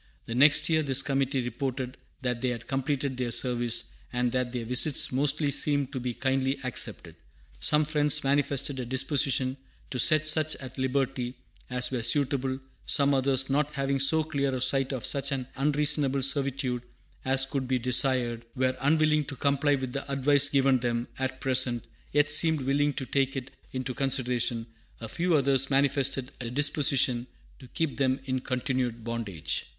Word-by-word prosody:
The 115 - -5
next 145 +4 +5
year 160 -1 +2
this 135 -2 +2
committee 135 -1 0
reported 130 +1 -4 0.3
that 125 -2 -2
they 130 - 0
had 120 -1 -5
completed 135 0 -2
their 125 -1 -2
service, 120 -1 +1 0.2
"and 125 0 0
that 125 -1 -1
their 120 -2 -4
visits 125 +5 +3
mostly 145 +2 +1
seemed 145 -2 +2
to 130 - -3
be 125 -1 -4
kindly 135 0 0
accepted. 125 -3 -5 0.4
Some 150 0 +2
Friends 150 -2 0
manifested 140 0 0
a 125 - -3
disposition 130 0 0 0.3
to 125 - -3
set 155 +3 +5
such 155 0 +1
at 130 0 -9
liberty 130 -1 -1 0.3
as 125 0 -1
were 125 -2 -2
suitable; 135 +1 0 0.3
some 140 -1 +3
others, 135 -1 +1
not 145 +2 0
having 135 0 0
so 155 +4 +4
clear 140 -3 -1
a - - -2
sight 135 +1 +1
of 130 -4 -4
such 140 0 -1
an 130 -2 -2
unreasonable 145 -1 +1
servitude 135 -2 -1 0.4
as 135 0 +3
could 135 -1 -3
be 130 0 +1
desired, 125 -1 +1
were 130 0 +1
unwilling 155 +1 +3
to 140 - -7
comply 140 +2 +1
with 130 -2 -5
the 140 0 -5
advice 140 +1 +3
given 135 -2 +3
them 120 0 -2
at 130 0 -2
present, 125 -3 +1 0.3
yet 145 0 +3
seemed 160 0 +4
willing 140 +2 +1
to 135 - -4
take 135 +1 0
it 135 0 -5 0.2
into 130 0 -4
consideration; 125 -3 -1 0.3
a 115 - -6
few 170 +8 0
others 135 -2 +3
manifested 135 -1 +1
a 120 - -4
disposition 135 -2 +1 0.3
to 130 - -13
keep 160 +2 -3
them 130 -1 +1
in 130 -1 -1
continued 125 -3 -2
bondage." 110 -9 -3
135 Hz, 165 wpm, -27 LUFS, 125-140 Hz, 0.4 s, next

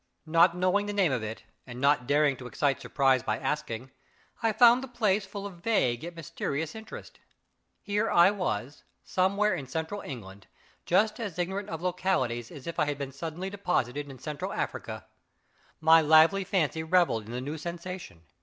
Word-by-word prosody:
Not 170 +2 +4
knowing 185 +3 +1
the 205 - -3
name 195 -6 +2
of 125 -4 -1
it, 110 +1 -6 0.2
and 120 0 -8
not 140 -2 +2
daring 145 0 +3
to 125 - -8
excite 140 +1 0
surprise 135 -2 +2
by 110 -1 -1
asking, 130 -3 -3 0.5
I 225 -1 +2
found 240 +3 +6
the - - -5
place 215 -5 0
full 200 0 -7
of 180 -4 -9
vague 130 - +1
yet 170 +1 -7
mysterious 160 -1 -4
interest. 220 0 -10 0.6
Here 205 +2 0
I 175 +3 +6
was, 145 - -3 0.2
somewhere 200 +3 +1
in 145 -7 -4
central 160 +8 -4
England, 100 -7 -9 0.4
just 215 +6 +2
as 205 -7 -5
ignorant 190 +3 -2
of 165 +1 -5
localities 130 -11 -1
as 145 -5 -11
if 170 - -5
I - - +3
had 145 -1 -2
been 140 -1 -5
suddenly 165 +6 -5
deposited 145 -8 -1
in 135 - -10
Central 150 +2 -5
Africa. - - -4 0.7
My 160 +1 +6
lively 160 +5 +5
fancy 160 -4 0
revelled 160 - +2
in - - -8
the 125 - -3
new 145 +5 -5
sensation. 170 - -7
165 Hz, 175 wpm, -28 LUFS, 135-190 Hz, 0.7 s, found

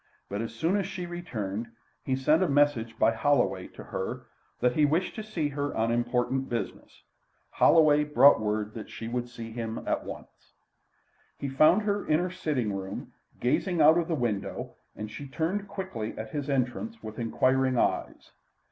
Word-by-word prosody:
But 100 +1 -2
as 115 - -4
soon 175 +5 +1
as 195 -2 -1
she 185 -2 -5
returned, 115 - -4 0.4
he 130 - 0
sent 150 +5 +3
a 185 - +2
message 140 -6 +2
by 110 - +4
Holloway 115 -7 +1
to - - -11
her, - - -5 0.3
that 125 0 +2
he 155 - +3
wished 160 +5 +2
to 215 - -6
see 175 -9 -2
her 145 0 -3
on 115 +1 +1
important 125 +2 0
business. 120 -1 -5 0.5
Holloway 150 -2 +5
brought 145 -4 +6
word 105 0 -1
that 110 - -8
she 115 - -7
would 120 +1 -3
see 115 -2 -8
him 115 -1 -4
at - - 0
once. - - -11 0.8
He 140 - -4
found 155 +9 +5
her 205 -1 0
in 155 - +2
her 180 +2 -1
sitting 140 - -1
room, 95 0 -6 0.3
gazing 170 +8 +1
out 160 +3 +7
of 165 - -1
the 165 - 0
window, 115 -7 -2 0.2
and 105 0 -6
she 140 +6 -7
turned 175 +8 -2
quickly 160 - -5
at 110 0 -6
his 145 -1 -3
entrance 140 - -2
with 110 +1 -7
inquiring 130 +2 +2
eyes. - - -1
135 Hz, 175 wpm, -28 LUFS, 115-160 Hz, 0.8 s, out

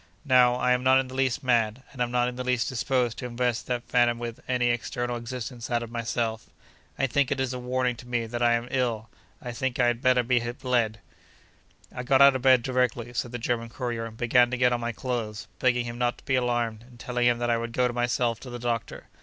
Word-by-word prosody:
Now, 125 -3 +5
I 125 0 +1
am 125 0 +3
not 130 +1 +5
in 130 -1 -2
the - - -9
least 130 +1 0
mad, 120 -1 +1
and 130 - -7
am 120 - +1
not 125 0 +1
in 125 - -4
the 125 - -4
least 125 -2 0
disposed 125 -2 0
to 125 - -4
invest 120 0 -1
that 125 -1 -2
phantom 120 -1 +3
with 115 -1 -6
any 125 -1 +1
external 120 +1 -2
existence 120 0 -6
out 120 -1 0
of 115 - -9
myself. 115 -1 -2 0.5
I 135 - +2
think 140 +1 +1
it 140 - -1
is 130 -1 -1
a 125 - -4
warning 125 0 -1
to 120 - -12
me 120 -2 -1
that 120 +1 -5
I 120 0 +4
am 120 +1 -1
ill; 115 -4 -1 0.3
and 125 - -7
I - - -3
think 130 +1 -2
I 125 - +3
had 120 0 +1
better 125 -1 +4
be 120 +1 +2
bled.' 120 -2 -1 0.9
I - - -4
got 130 +2 +3
out 140 -1 +8
of 130 - -2
bed 130 -2 +5
directly 125 -2 -1
(said 120 0 -2
the 125 - -4
German 115 -1 -2
courier) 120 -2 -4
and 110 0 -12
began 120 +1 +4
to 125 - -2
get 125 0 +3
on 120 - 0
my 120 0 -2
clothes, 115 -4 -4
begging 125 -1 +2
him 120 0 -6
not 120 0 0
to - - -19
be 135 - -1
alarmed, 120 -3 0
and 120 0 -17
telling 125 0 0
him 120 -1 +3
that 120 0 0
I 115 - +1
would 115 0 -4
go 125 +1 +2
myself 120 -1 0
to 130 - -10
the 120 - -6
doctor. 120 -1 -3
120 Hz, 250 wpm, -26 LUFS, 120-125 Hz, 0.9 s, out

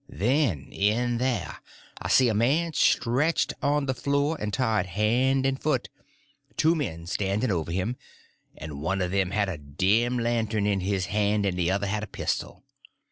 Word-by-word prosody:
Then 110 - 0
in 115 +4 +1
there 115 - -1 0.4
I - - -3
see 130 - +5
a 115 - +1
man 145 +10 +1
stretched 135 +5 +2
on 145 0 +1
the 130 - 0
floor 140 +4 0
and 105 0 -3
tied 110 -6 0
hand 125 +8 +1
and 135 0 0
foot, 155 - 0 0.6
and - - -33
two 160 +2 +4
men 85 - -3
standing 100 +5 -1
over 85 -3 -2
him, 95 +8 -2 0.6
and 75 -2 -7
one 95 +4 0
of 90 - -2
them 95 -1 +1
had 100 +1 0
a 90 -6 -4
dim 100 - +1
lantern 115 -3 0
in 100 -1 +1
his 95 0 -1
hand, 105 0 +1
and 95 -2 0
the 90 -1 0
other 100 +2 0
one 100 - -2
had 105 - -1
a 105 - -5
pistol. - - -4
105 Hz, 185 wpm, -26 LUFS, 95-130 Hz, 0.6 s, see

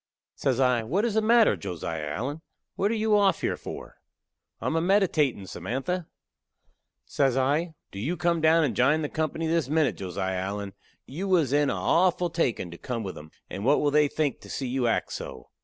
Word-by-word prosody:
Says 130 -2 0
I, 125 -3 +3
"What 180 - 0
is 230 - 0
the 220 - +2
matter, 230 +1 +5
Josiah 80 -5 -5
Allen? 130 - -4 0.3
What 200 - +1
are 230 - 0
you 215 -1 +2
off 200 -2 +3
here - - 0
for?" - - -9 0.6
"I - - -8
am - - 0
a 165 - +2
meditatin', 165 - +2
Samantha." 135 - -3 1.0
Says 135 - +1
I, 150 +5 +1 0.2
"Do 100 - -7
you 155 - -2
come 170 -1 +1
down 160 +1 +5
and 130 -8 0
jine 145 +8 +3
the 150 - -2
company 160 +1 -2
this 160 -3 0
minute, 155 -1 +1
Josiah 95 0 -3
Allen. 100 +1 -4 0.3
You 170 +9 -5
was 165 -8 +2
in 145 -1 +3
a - - 0
awful 180 0 +2
takin' 120 - -1
to 85 - -10
come 120 -3 -4
with 95 -2 -5
'em, 75 +1 -11 0.2
and 100 - -6
what 140 +5 +4
will 145 - +1
they 150 0 +4
think 145 -2 -1
to - - -13
see 135 - -3
you 125 -1 0
act 115 - 0
so?" - - -8
145 Hz, 205 wpm, -27 LUFS, 115-170 Hz, 1.0 s, matter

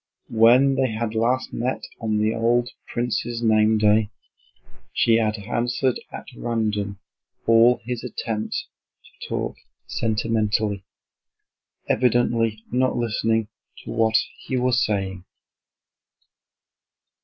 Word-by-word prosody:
When 120 +5 +5
they 135 -1 +1
had 110 0 -2
last 120 +4 0
met 125 +3 -2 0.2
on 110 -2 -1
the 110 +1 +1
old 120 +1 +1 0.2
prince's 120 0 -2
name 110 -1 +4
day, 105 0 +3 0.8
she 115 -1 +4
had 110 -1 0
answered 120 +4 -1
at - - -8
random 105 -4 -2 0.5
all 115 +2 +5
his 120 -1 -4
attempts 115 - -3 0.4
to - - -12
talk - - -3 0.3
sentimentally, 110 -2 0 1.0
evidently 115 -3 +1
not 130 +1 +1
listening 115 -1 0 0.3
to - - -7
what 110 -1 +3 0.2
he 130 - -3
was 125 0 +2
saying. 95 -3 -2
115 Hz, 105 wpm, -23 LUFS, 110-120 Hz, 1.0 s, When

